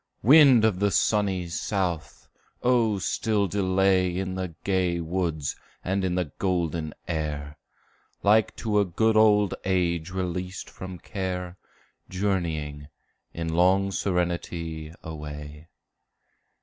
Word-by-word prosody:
Wind 135 -2 +7
of 100 -5 +1
the 100 0 +3
sunny 95 0 +1
south! 85 - -3 0.4
oh 120 -4 +3
still 105 +2 0
delay 95 -2 +2
In 95 0 -2
the 90 -3 -4
gay 90 -3 +1
woods 85 -3 -2 0.3
and 95 +1 -1
in 90 -1 0
the 90 -6 -1
golden 85 -4 -1
air, 75 -3 -3 0.7
Like 105 0 +4
to 105 -2 0
a - - +4
good 110 +5 +1
old 105 -2 +5
age 85 -3 0
released 90 0 -4
from 95 -1 -8
care, 90 -1 -4 0.5
Journeying, 80 -7 -2 0.4
in 80 -1 -4
long 95 +3 +3
serenity, 85 -4 -2
away. 75 -1 -8
90 Hz, 110 wpm, -26 LUFS, 85-100 Hz, 0.7 s, Wind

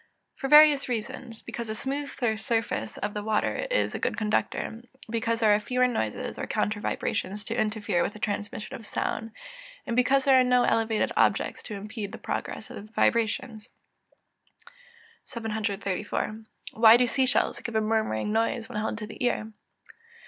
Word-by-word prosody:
_ - - -33 0.3
For 270 - -4
various 300 -2 +7
reasons: 230 0 -5
because 235 -1 -6
the 215 - -3
smooth 280 +4 -3 0.3
surface 220 - -2
of 205 0 -3
water 220 - 0
is - - +1
a - - -3
good - - -1
conductor; 220 +1 -1 0.3
because 230 0 0
there 215 -2 +5
are 205 - +3
fewer 250 +4 +1
noises, 110 - -3
or - - -3
counter 210 0 -1
vibrations, 205 0 -2
to 230 - -2
interfere 210 -5 0
with 205 - -1
the - - -10
transmission 210 0 -4
of 225 - -10
sound; 225 +1 -3 0.5
and 235 - -2
because 265 +2 +3
there 265 -2 +6
are - - +5
no 250 0 +4
elevated 225 -1 +1
objects - - +2
to 210 - -7
impede 205 +1 -6
the - - -6
progress - - -5
of - - -7
the - - -26
vibrations. 230 0 0 1.6
734. 215 -1 -3 0.3
_Why 225 +1 +8
do 250 - +4
sea 260 +2 +1
shells 265 - +1
give 235 - -6
a - - +4
murmuring 215 - 0
noise 225 +1 0
when 235 -4 -4
held 220 0 -2
to 215 - -5
the 220 +4 -7
ear? 220 -3 0
225 Hz, 170 wpm, -27 LUFS, 210-245 Hz, 1.6 s, Why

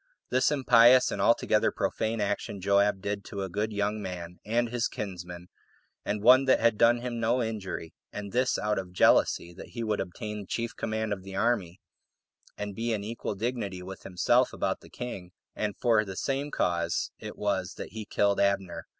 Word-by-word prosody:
This 130 - +3
impious 125 -3 +6
and - - -2
altogether - - +3
profane 110 +1 -1
action 100 -1 -2
Joab 100 +1 +2
did 100 0 -3
to 100 -1 -5
a 95 - -4
good 105 +4 -2
young 105 +1 -1
man, 90 -2 -6
and 115 +2 0
his 120 -1 0
kinsman, 90 -3 -7 0.6
and 105 0 -2
one 130 +3 +7
that 130 - +4
had 115 -1 +3
done 120 +2 +4
him 120 -1 -4
no 120 +2 +2
injury, 100 -7 -5 0.2
and 100 -1 -6
this 125 +1 +1
out 105 -1 0
of 90 -1 -8
jealousy 85 -1 +3
that 90 - -12
he 115 - -1
would 110 -2 -1
obtain 105 +3 -5
the 100 - -9
chief 115 0 -3
command 110 -1 -2
of 95 - -6
the 95 0 -9
army, 100 -5 0 0.8
and 105 -1 -4
be 115 +3 -1
in 105 -2 -2
equal 110 -1 -4
dignity 100 -4 -3
with 95 +1 -8
himself 90 -2 +2
about - - -1
the - - -16
king; 95 -8 -7 0.2
and 105 -2 -2
for 115 -3 +3
the 95 -2 -7
same 140 +6 -2
cause 85 -8 0
it - - -8
was - - -1
that - - -7
he 110 -1 -6
killed 100 -1 +1
Abner. 100 -3 0
105 Hz, 190 wpm, -28 LUFS, 95-115 Hz, 0.8 s, one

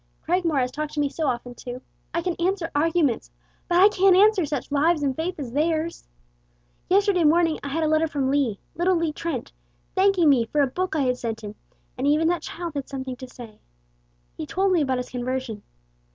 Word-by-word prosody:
Cragmore 340 -3 +1
has 250 0 -1
talked 300 +2 -4
to 300 - -3
me 290 -1 +1
so 310 +1 -2
often, 245 -1 -2
too. 245 +1 -8 0.3
I 340 +1 -2
can 360 - 0
answer 355 -1 -1
arguments, 300 -4 +1 0.4
but 350 - +2
I 390 - +9
can't 390 -2 +4
answer 395 -4 +4
such 290 -1 -4
lives 300 +2 +2
and 270 -2 0
faith 340 +5 -3
as 260 -5 -5
theirs. 315 +4 -1 0.8
Yesterday 390 -2 +3
morning 325 +1 +3
I - - -6
had 320 +4 -1
a - - +2
letter 310 +1 +2
from 275 -3 -1
Lee 270 -8 +1 0.2
little 360 +2 +2
Lee 330 -2 0
Trent 305 -7 -4 0.4
thanking 380 -3 +3
me 260 -5 +4
for 295 - +1
a - - +5
book 360 +6 -3
I 305 - +1
had 250 -2 0
sent 225 -2 -4
him, 205 0 -6 0.5
and 270 - 0
even 305 +3 +3
that 350 -1 0
child 340 -2 -6
had 280 -2 -5
something 260 -2 -5
to 260 - -9
say. 235 -4 -12 0.8
He - - -6
told 385 +1 +1
me 350 -3 +3
about 265 -3 0
his 250 - -4
conversion. 250 -3 -3
305 Hz, 210 wpm, -24 LUFS, 260-345 Hz, 0.8 s, I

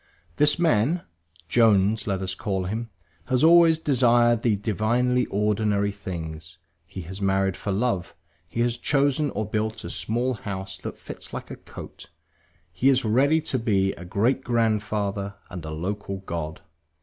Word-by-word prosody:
This 150 0 +4
man 165 0 +2 0.4
(Jones 110 -2 +3
let 95 -2 -1
us 95 -1 -2
call 95 0 -2
him) 110 +5 -4 0.4
has 130 +1 +1
always 165 0 +7
desired 120 -6 +3
the 115 -3 +2
divinely 120 +5 +1
ordinary 105 0 +1
things; 80 -4 -7 0.3
he 95 - -7
has 95 +4 -8
married 95 -1 +1
for 100 - -4
love, 100 -3 -1 0.3
he 115 - -2
has 120 0 0
chosen 145 +1 +2
or 110 -5 -3
built 110 +1 -2
a - - -6
small 120 +4 -1
house 95 -3 -6
that - - -7
fits - - -9
like - - -6
a - - -5
coat; - - -11 0.6
he 130 +11 +2
is 130 -2 +3
ready 135 +8 +3
to 135 -4 -2
be 100 -4 +1
a 85 - -10
great 110 +9 0
grandfather 105 -4 -1 0.2
and 90 -3 -7
a - - -5
local 95 +5 -4
god. 85 -2 -5
105 Hz, 155 wpm, -25 LUFS, 95-125 Hz, 0.6 s, always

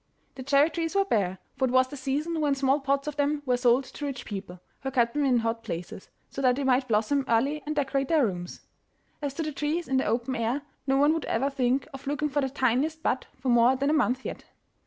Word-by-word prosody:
The 265 - -9
cherry 280 +4 +3
trees 330 +2 -3
were 395 0 +3
bare, 195 - 0 0.2
for 265 - +3
it 250 - -1
was 255 0 +4
the 290 - -8
season 295 +5 -2
when 290 -2 +2
small 270 +1 +2
pots 275 +1 0
of 300 -1 -4
them 290 0 0
were 250 -1 +2
sold 245 +1 +3
to 290 - -10
rich 275 -2 -5
people, 195 -3 -7 0.2
who 270 - -2
kept 240 -3 +1
them 295 -1 +1
in 255 -3 +3
hot 230 0 -1
places, 170 +3 -6 0.2
so 275 - -6
that 255 -2 +4
they 280 - -2
might 260 0 +2
blossom 230 +5 +1
early 275 +7 +1
and 305 - -2
decorate 275 -1 0
their 310 -4 +3
rooms. 175 -4 -5 0.6
As 280 -2 -3
to 325 - -2
the 305 - -3
trees 300 +4 -2
in 265 - +1
the 260 - +1
open 240 +4 -1
air, 235 +4 -1 0.2
no 270 0 +3
one 290 +3 +4
would 325 - -2
ever 270 +5 0
think 260 0 0
of 270 0 -9
looking 295 +1 -1
for 290 +1 0
the 270 - -1
tiniest 275 +5 0
bud 255 - 0
for 260 - -3
more 240 +2 +5
than 280 +3 0
a - - +2
month 260 -4 +1
yet. - - -6
270 Hz, 245 wpm, -27 LUFS, 245-290 Hz, 0.6 s, more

